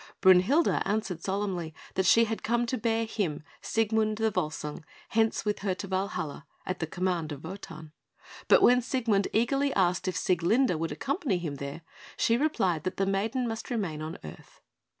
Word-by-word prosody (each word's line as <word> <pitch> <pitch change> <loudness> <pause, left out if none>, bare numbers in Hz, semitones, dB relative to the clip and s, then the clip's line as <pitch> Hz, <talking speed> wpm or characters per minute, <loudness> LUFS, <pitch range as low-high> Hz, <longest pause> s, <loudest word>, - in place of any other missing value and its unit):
Brünhilde 190 - +5
answered 200 -5 -2
solemnly 190 -5 -2 0.2
that 190 0 +1
she 230 - +6
had 225 0 -3
come 235 +1 +1
to 240 - -1
bear 225 -1 0
him, 195 -10 -2 0.2
Siegmund 220 -1 +1
the 220 0 +1
Volsung, 155 -3 -3 0.3
hence 225 0 +1
with 210 0 0
her 195 -2 -1
to 190 - -6
Valhalla, 185 -7 -3 0.2
at 185 0 -3
the 160 - -2
command 175 -2 -1
of 145 -1 -7
Wotan; 160 -3 -8 0.6
but - - +6
when 250 +1 +6
Siegmund 230 -6 +1
eagerly 275 +5 +2
asked 185 -1 +2
if 185 - -1
Sieglinde 180 +2 +2
would 165 -1 -2
accompany 260 - -1
him 160 -5 -4
there, 140 +4 -6 0.3
she 230 - +3
replied 195 - +1
that 185 - -3
the 195 - +2
maiden 220 +6 0
must 225 -1 -5
remain 190 -11 -2
on 155 +1 -5
earth. 75 - -12
195 Hz, 170 wpm, -28 LUFS, 170-225 Hz, 0.6 s, she